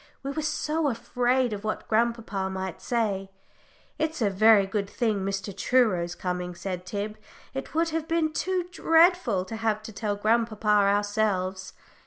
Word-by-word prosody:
We 275 - -3
were 310 - -3
so 310 0 0
afraid 245 0 0
of 205 0 -6
what 215 - -3
grandpapa 220 -4 0
might 190 -2 -5
say. 205 -5 -1 0.7
"It's 315 +1 -1
a 210 -4 +2
very 210 +1 +6
good 200 0 -2
thing 220 -4 0
Mr. 195 0 -3
Truro's 185 -9 +2
coming," 180 -1 -3
said 180 0 -5
Tib. 210 +2 -4 0.4
"It 270 +3 -6
would 330 +1 +2
have 320 0 -3
been 325 -2 +1
too 365 +1 -1
dreadful 325 - +3
to 225 +4 -6
have 220 -1 +1
had 215 - -19
to 220 - -8
tell 205 0 -2
grandpapa 220 +1 0
ourselves." 200 -2 +1
215 Hz, 160 wpm, -27 LUFS, 195-255 Hz, 0.7 s, very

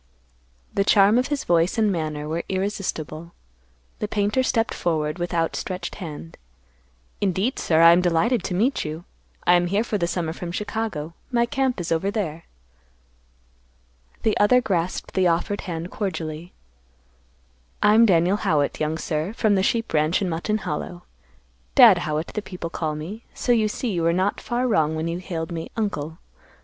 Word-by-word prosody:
The 200 - +2
charm 205 +3 +5
of 255 - 0
his 290 -2 -2
voice 170 +4 +2
and 215 -2 +3
manner 155 -4 -3
were 165 +2 -2
irresistible. 180 -4 -3 0.7
The 210 - -2
painter 205 +4 +1
stepped 230 -3 0
forward 155 -1 -1
with 175 0 -2
outstretched 170 +2 -2
hand, 150 - -8 0.8
"Indeed, 200 +6 0
sir; 160 -1 +2
I 165 0 +9
am 175 +1 +5
delighted 180 +6 +2
to 180 - -2
meet 235 +9 +1
you. 155 +2 -6 0.4
I 175 - +6
am 175 0 +3
here 200 +5 +1
for 215 -3 -2
the 170 - +1
summer 170 -2 -2
from 175 0 -6
Chicago. 205 -6 -3 0.2
My 235 -1 +3
camp 265 -2 -1
is 175 0 -4
over 165 +4 +1
there." 170 -7 -3 1.8
The 220 - +2
other 230 +5 +5
grasped 185 -6 -2
the 185 -1 +3
offered 175 +4 0
hand 170 +1 -4
cordially, 165 -4 -4 1.3
"I 210 - +6
am 230 +1 +6
Daniel 180 +1 +3
Howitt, 145 -7 0
young 155 +1 -1
sir; 160 +4 -2
from 215 -2 +2
the 190 - +3
sheep 225 +2 0
ranch 155 +2 +2
in 195 - -1
Mutton 170 +6 -1
Hollow. 175 -1 -5 0.7
Dad - - +8
Howitt, 155 +1 -3
the 210 - -2
people 180 -4 -7
call 155 -3 -2
me. 185 +10 -7
So 245 - 0
you 225 -3 +3
see 225 +2 -3
you 175 -3 -1
were 165 0 +2
not 190 +3 0
far 245 +1 -1
wrong 160 -8 +2
when 160 +1 -2
you 170 +1 -3
hailed 170 -2 -5
me 165 -1 -5
'Uncle. 160 -8 -2
180 Hz, 170 wpm, -23 LUFS, 165-210 Hz, 1.8 s, I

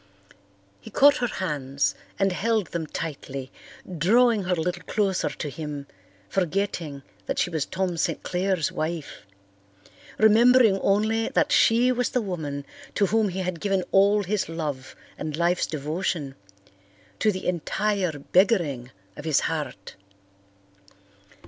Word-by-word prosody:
He 95 - -11
caught 285 +1 +5
her 245 - 0
hands 140 - -1 0.2
and 195 0 +2
held 215 0 0
them 165 -2 -3
tightly, 140 -4 -6 0.5
drawing 225 +3 +4
her 180 0 +1
a - - -4
little 180 +2 -2
closer 195 -4 0
to 155 - -5
him, 145 -1 -6 0.4
forgetting 175 -6 -2 0.2
that - - -2
she 175 - +1
was 160 -4 -1
Tom 185 -2 -2
St. - - -1
Clair's 185 -3 0
wife, 160 -6 -5 0.9
remembering 225 -1 +6
only 220 +3 +1
that - - +1
she 240 +3 +4
was 250 -1 0
the 250 - 0
woman 150 -8 -4 0.3
to 200 - +3
whom 215 +1 +2
he 190 +1 -3
had 180 -3 -3
given 195 -2 +1
all 200 +2 +4
his 200 -2 -1
love 150 -5 -5 0.2
and 155 -1 -4
life's 175 +1 +1
devotion, 155 -1 -3 0.9
to 215 - +3
the 185 -1 -6
entire 180 0 -1
beggaring 170 - +2 0.3
of 150 - -9
his 155 -3 +3
heart. 150 -11 -4
180 Hz, 135 wpm, -25 LUFS, 155-205 Hz, 0.9 s, remembering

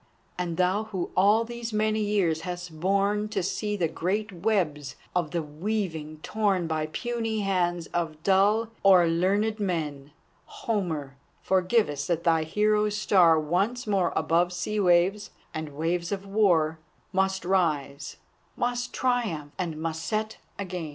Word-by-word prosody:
And 175 -2 -3
thou 185 +4 +1
who 190 -5 -4
all 205 +4 +4
these 235 0 -6
many 215 0 +1
years 200 -7 +1
hast 175 -2 -6
borne 200 +3 +1
To 215 - -1
see 210 +3 -2
the 170 -4 +1
great 200 +7 -2
webs 170 -8 -1 0.2
of 175 -4 +1
the 170 0 -2
weaving 160 -2 -4
torn 200 -5 0
By 155 -1 -1
puny 225 +4 -2
hands 175 -3 0
of 160 -3 -2
dull, 205 +4 +3
o'er 185 -3 +6
learned 200 +6 +1
men, 150 -7 -3 0.3
Homer, 160 -11 -3 0.3
forgive 190 +4 +2
us 145 -1 -4
that 170 -1 0
thy 165 -2 +3
hero's 210 +3 +1
star 175 -6 +5
Once 195 +11 0
more 195 -4 +1
above 175 +2 +2
sea 210 +4 -2
waves 185 +2 +3 0.2
and 155 -2 -5
waves 170 +3 -1
of 200 -1 -3
war, 175 -6 +2 0.3
Must 190 0 0
rise, 155 -7 0 0.4
must 245 0 -2
triumph, 220 - -1
and 170 -4 -2
must 160 0 -3
set 215 0 -2 0.2
again! 180 -5 -4
185 Hz, 145 wpm, -27 LUFS, 165-210 Hz, 0.4 s, o'er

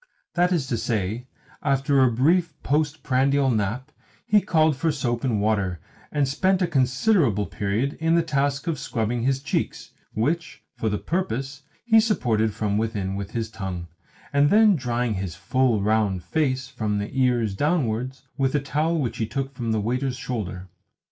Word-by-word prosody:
That 180 +1 +2
is 165 -7 +1
to 115 - 0
say, 110 +2 -2 0.3
after 140 0 +2
a 130 -2 +5
brief 160 +6 +2
post 150 +2 0
prandial 135 +1 +2
nap 115 +6 -2 0.3
he 210 0 +4
called 160 -6 +3
for 160 +5 0
soap 120 -5 -2
and 120 -6 +1
water, 100 -4 0 0.3
and 145 -2 +1
spent 185 +7 +2
a 185 - +2
considerable 130 - +2
period 105 +9 -2
in 165 +1 +3
the 170 - +3
task 140 -2 0
of 165 -5 -2
scrubbing 115 -2 -2
his 135 +2 0
cheeks 145 - -2 0.2
(which, 160 +9 -1
for 110 - -1
the 105 - -1
purpose, 145 - -3 0.2
he 225 -2 +6
supported 115 - +1
from 105 -1 0
within 105 -4 -2
with 100 +1 -5
his 115 -1 -3
tongue) 90 -5 -5 0.4
and 140 +1 +4
then 215 +2 +6
of 190 - +2
drying 120 -3 -1
his 95 -4 -4
full, 110 +3 +1
round 105 -4 +1
face, 130 - 0
from 105 -5 -2
the 100 0 -3
ears 125 -5 +2
downwards, 130 - -1 0.2
with 135 +1 +1
a - - +4
towel 155 +4 0
which 130 -7 -2
he 110 - -1
took 135 +2 -3
from 120 -3 -3
the 110 - +1
waiter's 125 +4 -1
shoulder. 100 -8 -4
130 Hz, 175 wpm, -24 LUFS, 110-145 Hz, 0.4 s, he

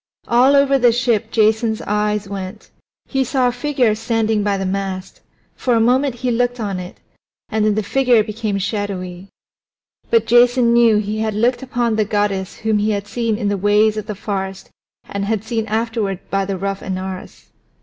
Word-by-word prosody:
All 255 +4 +4
over 275 -1 +4
the 245 -1 +5
ship 235 -2 0
Jason's 220 0 +2
eyes 210 0 -1
went. 195 +1 -7 0.3
He 270 -1 0
saw 255 0 +1
a - - +1
figure 250 -3 +1
standing 225 -1 0
by 200 -1 0
the 195 - -3
mast; 190 0 -4 0.3
for 245 -2 0
a - - +3
moment 255 +3 +2
he 250 - +2
looked 245 +1 0
on 200 -4 -3
it, 180 0 -9 0.5
and 220 -1 0
then 210 -1 +2
the 215 - 0
figure 245 +1 +3
became 215 -1 -3
shadowy. 195 -2 -4 0.8
But 230 -1 +3
Jason 240 +1 +4
knew 235 -2 +5
that 210 - +1
he 215 +1 -3
had 220 -1 -1
looked 240 +3 +1
upon 240 -3 -1
the 215 - +2
goddess 205 -2 -1
whom 220 -1 0
he 210 +1 +1
had 200 -1 -1
seen 225 0 -1
in 210 -2 -2
the 200 0 0
ways 210 +2 +3
of 215 -1 -5
the 210 - -4
forest 190 -1 -5 0.4
and 200 0 -3
had 215 -1 -1
seen 225 -1 -2
afterward 220 -3 -1
by 195 0 +1
the 195 -1 -3
rough 195 +1 -3
Anaurus. 185 0 -6
215 Hz, 190 wpm, -19 LUFS, 200-235 Hz, 0.8 s, the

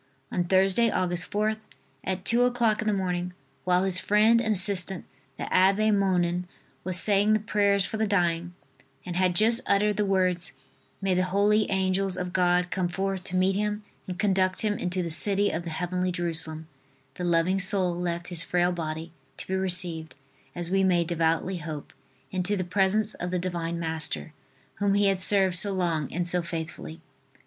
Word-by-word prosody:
On 180 - 0
Thursday, 190 +5 +2
Aug. 180 -4 -1
4th, 210 +5 -2 0.4
at 185 0 -4
two 235 +1 +3
o'clock 240 -3 +1
in 215 - -3
the - - +3
morning, 180 -2 -2 0.3
while 180 0 +2
his 190 -1 +1
friend 215 +4 +3
and 220 -2 0
assistant, 190 -1 +2 0.3
the - - -5
Abbe 195 +4 +3
Monnin, 180 -3 +1 0.4
was 185 0 +1
saying 205 +1 +4
the 215 - +3
prayers 200 -2 +1
for 220 - -4
the 220 0 0
dying 175 -3 0 0.5
and 175 - -5
had 185 -1 +1
just 230 +5 +4
uttered 210 +1 +2
the 210 - +1
words: 180 -3 +1 0.5
"May 190 -1 +2
the 185 0 +1
holy 205 +3 +2
Angels 190 0 0
of 180 -1 -4
God 180 0 +1
come 185 -2 -1
forth 190 +1 -3
to 185 - -5
meet 185 +1 +2
him 210 +1 -2 0.2
and 180 -1 -5
conduct 190 -2 +1
him 210 -1 +1
into 180 -1 -2
the 170 - -3
city 200 +4 +3
of 170 +2 -4
the - - -4
Heavenly 180 +3 -2
Jerusalem," 160 -2 -2 0.5
the 180 - -7
loving 175 +2 +1
soul 190 -3 +1
left 175 0 -4
his 175 -2 -1
frail 175 +1 0
body 160 -1 -5 0.3
to - - -2
be 190 - -4
received, 180 -4 +1 0.4
as 175 0 -3
we 195 0 +2
may 180 -2 +3
devoutly 170 +2 -1
hope, 155 -3 -7 0.4
into 190 +2 -1
the 185 - -1
presence 195 +4 +1
of 180 - -5
the 180 - -1
Divine 170 -2 -3
Master, 160 -2 -3 0.5
whom 200 -1 +1
he 205 0 +3
had 195 -1 +2
served 190 0 +3
so 200 +3 +3
long 170 -6 -1
and 175 +2 -2
so 180 0 +1
faithfully. 160 - -7
185 Hz, 180 wpm, -26 LUFS, 175-200 Hz, 0.5 s, saying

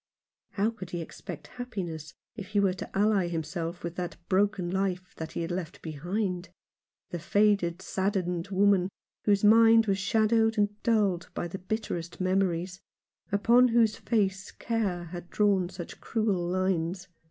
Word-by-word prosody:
How 215 +2 +1
could 185 -6 -9
he 175 - -4
expect 165 0 -8
happiness 175 -10 -6 0.2
if 205 -4 -7
he 205 +1 +1
were 195 -2 +3
to 180 - -7
ally 205 -3 +3
himself 170 +1 -4
with 170 0 -5
that 180 -1 -3
broken 195 -2 +1
life 185 -1 -2 0.2
he 170 - -3
had 165 - -4
left 175 -2 -4
behind, 180 +3 -3 0.6
the 175 - -3
faded, 195 -1 +2
saddened 190 -3 -1
woman, 195 -1 +3 0.4
whose 200 -1 +3
mind 225 +1 +7
was 195 -2 +1
shadowed 220 +2 +2
and 205 0 0
dulled 205 -7 +1
by 175 - -2
bitterest 180 -2 -4
memories, 185 -1 0 0.5
upon 235 +5 +5
whose 230 -2 +3
face 195 -5 0
care 205 -7 -2
had 175 +1 -8
drawn 195 -4 +2
such 180 -2 -9
cruel 205 -6 0
lines 185 0 -1
190 Hz, 140 wpm, -28 LUFS, 175-210 Hz, 0.6 s, mind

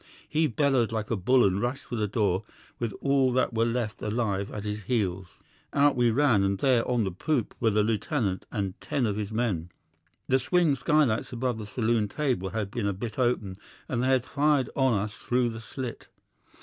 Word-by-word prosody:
He 155 +1 +2
bellowed 130 -2 +2
like 110 -1 -3
a - - +2
bull 125 +6 +4
and 95 +1 +1
rushed 130 +3 -2
for - - -6
the 105 -2 0
door 100 -3 0 0.4
with 115 -2 -1
all 135 -2 +3
that 130 -1 +1
were 115 +1 +2
left 115 -2 -2
alive 105 -3 -1
at 105 - -5
his 105 0 -4
heels. 95 -7 -1 0.5
Out 145 0 +4
we 120 -1 +3
ran, 120 -3 +3
and 100 0 +1
there 125 +1 +3
on 120 -2 +2
the 95 - -1
poop 125 - -1
were 115 - +3
the 105 0 +2
lieutenant 110 -2 -1
and 100 -4 -2
ten 135 -4 -1
of 105 -3 0
his 105 0 -4
men. 105 -8 -1 0.6
The 130 0 +3
swing 165 +1 +2
skylights 140 -4 +1
above 125 -1 -2
the 105 - -6
saloon 110 -1 +1
table 125 -7 -1
had 100 0 -3
been 110 -2 -2
a 100 - 0
bit 105 +4 -6
open, 105 -6 0 0.3
and 120 -2 -1
they 130 - +1
had 130 -2 +2
fired 145 -2 +1
on 130 -4 +3
us 105 +1 -3
through 125 +1 0
the 115 -1 -6
slit. 125 +1 -6
115 Hz, 200 wpm, -27 LUFS, 105-130 Hz, 0.6 s, bull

